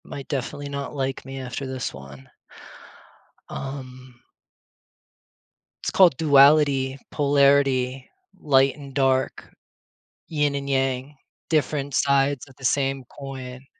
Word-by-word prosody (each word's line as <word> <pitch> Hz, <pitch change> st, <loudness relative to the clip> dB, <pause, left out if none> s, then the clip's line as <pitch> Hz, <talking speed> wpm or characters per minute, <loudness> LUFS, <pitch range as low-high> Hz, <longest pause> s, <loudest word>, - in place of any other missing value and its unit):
Might 140 Hz, -, -8 dB
definitely 145 Hz, +1 st, -4 dB
not 140 Hz, +1 st, -5 dB
like 135 Hz, -2 st, -3 dB
me 135 Hz, 0 st, -7 dB
after 130 Hz, +1 st, -5 dB
this 130 Hz, -1 st, -4 dB
one. 70 Hz, 0 st, -12 dB, 1.2 s
Um 130 Hz, -2 st, -8 dB, 1.6 s
It's -, -, -1 dB
called 180 Hz, -7 st, +5 dB
"duality," 140 Hz, -2 st, +4 dB
"polarity," 140 Hz, -3 st, +2 dB, 0.3 s
"light 135 Hz, -2 st, +3 dB
and 140 Hz, -2 st, -11 dB
dark," 135 Hz, -1 st, 0 dB, 0.8 s
"yin 145 Hz, -3 st, 0 dB
and 140 Hz, 0 st, -4 dB
yang," 135 Hz, +1 st, -1 dB, 0.3 s
"different 150 Hz, -3 st, 0 dB
sides 140 Hz, 0 st, +1 dB
of 135 Hz, -, -17 dB
the 135 Hz, -, -14 dB
same 135 Hz, +1 st, +1 dB
coin." 130 Hz, -1 st, -9 dB
135 Hz, 110 wpm, -24 LUFS, 130-140 Hz, 1.6 s, called